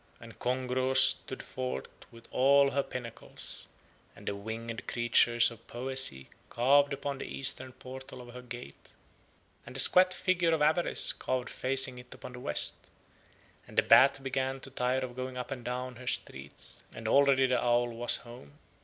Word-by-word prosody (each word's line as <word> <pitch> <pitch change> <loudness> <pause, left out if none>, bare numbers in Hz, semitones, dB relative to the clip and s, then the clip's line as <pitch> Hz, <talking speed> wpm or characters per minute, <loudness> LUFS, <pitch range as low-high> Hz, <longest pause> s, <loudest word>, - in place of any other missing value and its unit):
And - - -13
Kongros 130 +1 0
stood 130 - +3
forth 65 +1 -4 0.2
with 115 0 -15
all 140 +1 +4
her 140 - +1
pinnacles, 125 -4 -8 0.5
and - - -15
the 100 - -1
winged 115 +3 -6
figure 120 0 +3
of 115 - -14
Poesy 125 - 0 0.2
carved 140 +4 +4
upon 140 0 -4
the - - -5
eastern 130 -1 -4
portal 130 +1 -10
of 120 -1 -11
her 125 - -8
gate, 120 - -10 0.7
and - - -12
the - - +2
squat 185 0 +7
figure 180 -3 +1
of 155 - -4
Avarice 160 +3 +2
carved 130 -1 -3
facing 130 -1 -1
it 125 0 -14
upon 125 - -10
the 125 - -8
west; 75 -11 +1 0.9
and - - -14
the - - +5
bat 135 0 +6
began 135 0 -2
to 135 - -9
tire 130 0 0
of 120 -1 -10
going 130 0 -5
up 125 - -5
and 125 -2 -5
down 125 0 -4
her 125 0 -11
streets, 70 - -5
and 110 - -7
already 135 +2 +5
the 125 -1 +1
owl 120 0 +2
was 120 +1 0
home. 120 -13 -11
125 Hz, 170 wpm, -30 LUFS, 120-135 Hz, 0.9 s, squat